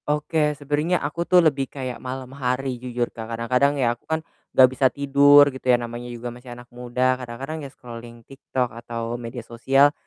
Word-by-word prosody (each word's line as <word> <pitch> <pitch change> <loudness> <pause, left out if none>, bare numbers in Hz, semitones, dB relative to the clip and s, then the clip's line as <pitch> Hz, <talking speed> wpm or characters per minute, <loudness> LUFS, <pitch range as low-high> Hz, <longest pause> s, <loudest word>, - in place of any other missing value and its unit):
Oke, 150 0 +1
sebenarnya 150 +5 0
aku 170 +3 -4
tuh 180 -2 +6
lebih 140 -4 +1
kayak 130 -3 -6
malam 130 0 -6
hari 130 -1 -2
jujur 125 -1 -3
Kak, 115 -1 -7
kadang-kadang 125 +5 +2
ya 120 -3 +2
aku 120 - -21
kan 160 0 -1 0.2
nggak 130 - +7
bisa 130 0 +3
tidur 140 +1 +6
gitu 130 - -9
ya, 125 - +6
namanya 120 0 -6
juga 120 0 -6
masih 120 0 -11
anak 120 - -12
muda, 125 +1 0
kadang-kadang 135 +6 -6
ya 140 - -7
scrolling 120 -2 -11
TikTok 130 -3 -3
atau 115 0 -4
media 115 0 -7
sosial 135 +5 +3
130 Hz, 185 wpm, -23 LUFS, 120-140 Hz, 0.2 s, nggak